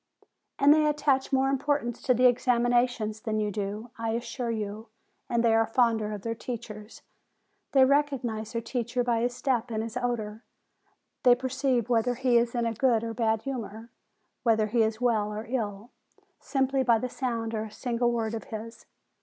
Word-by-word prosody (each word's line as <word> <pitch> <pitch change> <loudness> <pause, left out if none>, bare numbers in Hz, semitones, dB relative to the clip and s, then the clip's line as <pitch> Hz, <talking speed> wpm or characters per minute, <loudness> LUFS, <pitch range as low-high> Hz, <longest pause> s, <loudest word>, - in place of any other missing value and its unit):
"And 280 +1 +6
they 305 0 +3
attach 290 -3 +1
more 265 0 +3
importance 275 -3 -1
to 255 - +2
the 250 - +1
examin 245 -1 +3
ations 240 -3 +1
than 215 -1 -1
you 210 -1 -1
do, 210 +3 -4
I 225 -1 -1
assure 240 +1 -3
you, 215 0 -4 0.4
and 235 0 +1
they 230 -1 +4
are 225 0 +3
fonder 225 -3 +2
of 205 -2 -6
their 230 - -2
teachers. 225 -2 -8 0.7
They 265 -2 +7
recognize 260 -6 0
their 230 -1 -2
teacher 245 0 -2
by 235 -2 +1
his 245 +1 -1
step 250 -2 0
and 220 -1 -2
his 225 +1 -7
odor; 230 -3 -3 0.8
they 245 -1 +6
perceive 260 -1 0
whether 245 0 +1
he 245 -1 +3
is 235 +1 -1
in 235 -1 0
a 230 - 0
good 230 -1 +2
or 230 0 -3
bad 225 -2 0
humor, 230 -4 -6 0.5
whether 220 -3 +3
he 225 +2 +1
is 220 0 0
well 220 -4 +1
or 215 +1 -5
ill, 225 -2 -3 0.5
simply 270 -1 0
by 240 -3 +4
the 255 - -3
sound 230 -3 -3
of 220 0 -2
a - - -12
single 240 +2 -1
word 225 -2 -1
of 225 - -5
his. 225 +1 -8
235 Hz, 185 wpm, -28 LUFS, 220-250 Hz, 0.8 s, They